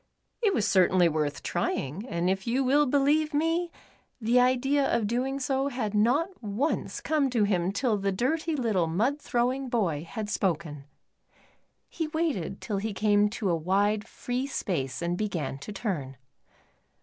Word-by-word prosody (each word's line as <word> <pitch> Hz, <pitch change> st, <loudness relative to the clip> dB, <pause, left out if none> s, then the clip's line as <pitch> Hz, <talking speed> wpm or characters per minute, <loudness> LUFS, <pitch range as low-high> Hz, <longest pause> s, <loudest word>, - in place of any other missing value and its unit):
It 410 Hz, -5 st, +2 dB
was 205 Hz, -, +1 dB
certainly 185 Hz, -2 st, +4 dB
worth 150 Hz, -3 st, -1 dB
trviuiJ, 160 Hz, -, -2 dB
and 170 Hz, +1 st, -1 dB
if 190 Hz, +1 st, 0 dB
vou 250 Hz, +3 st, +1 dB
will 285 Hz, +3 st, +3 dB
believe 290 Hz, +3 st, +2 dB
me, 330 Hz, +3 st, +1 dB, 0.5 s
the 235 Hz, +2 st, +3 dB
idea 260 Hz, +3 st, +3 dB
of 235 Hz, -2 st, +1 dB
doing 255 Hz, +5 st, -1 dB
so 270 Hz, +1 st, 0 dB
had 245 Hz, -6 st, -3 dB
not 245 Hz, -, +3 dB
once 220 Hz, +8 st, -2 dB
come 300 Hz, -3 st, +1 dB
to 235 Hz, -4 st, +2 dB
him 185 Hz, -3 st, +1 dB
till 215 Hz, 0 st, 0 dB
the 195 Hz, 0 st, 0 dB
dirty 310 Hz, -, 0 dB
little, 215 Hz, -, +1 dB
mud 235 Hz, -, 0 dB
throwing 255 Hz, +2 st, 0 dB
boy 175 Hz, -11 st, 0 dB
had 215 Hz, -1 st, -4 dB
spoken. 165 Hz, -8 st, -2 dB, 1.0 s
He 325 Hz, -2 st, -3 dB
waited 305 Hz, -, -2 dB
till 210 Hz, -3 st, -2 dB
he 210 Hz, +2 st, -2 dB
came 205 Hz, 0 st, +3 dB
to 205 Hz, -3 st, -1 dB
a -, -, +2 dB
wide, 200 Hz, +6 st, +1 dB
free 250 Hz, +2 st, -3 dB
space 170 Hz, -, -3 dB
and 170 Hz, +1 st, 0 dB
began 175 Hz, -9 st, -3 dB
to 140 Hz, -, -8 dB
turn. 165 Hz, -, -4 dB
215 Hz, 160 wpm, -28 LUFS, 185-270 Hz, 1.0 s, certainly